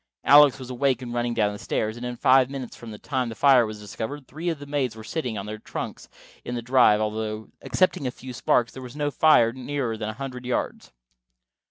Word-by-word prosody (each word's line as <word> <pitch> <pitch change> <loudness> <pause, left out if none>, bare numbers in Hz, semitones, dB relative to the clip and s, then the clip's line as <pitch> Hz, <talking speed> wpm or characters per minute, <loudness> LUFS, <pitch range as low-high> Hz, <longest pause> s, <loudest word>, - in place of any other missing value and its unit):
Alex 145 -1 +7
was 130 -1 -8
awake 130 +1 0
and 120 -1 -6
running 120 0 -1
down 105 -1 +1
the 105 - -8
stairs, 110 0 -2
and 120 - -9
in 125 - -5
five 130 +1 +4
minutes 135 -3 -6
from 120 - -10
the 105 - -8
time 130 +1 -2
the 115 - -7
fire 125 +1 +5
was 110 0 -7
discovered, 110 +7 -6
three 160 +5 -4
of 165 - -2
the 145 - -10
maids 140 -5 -1
were 110 - -10
sitting 125 -4 -3
on 100 - -5
their 105 0 -6
trunks - - -7 0.3
in 120 - -4
the 120 - -3
drive, 125 -4 +5
although, 110 0 -3
excepting 185 -7 +1
a - - 0
few 125 +1 -9
sparks, 120 0 +1
there 130 - -9
was 125 +1 -10
no 145 -1 -1
fire 130 -7 +5
nearer 130 -2 -3
than 110 0 -4
a - - -4
hundred 130 +1 -7
yards. 125 0 -3
125 Hz, 230 wpm, -25 LUFS, 110-135 Hz, 0.3 s, Alex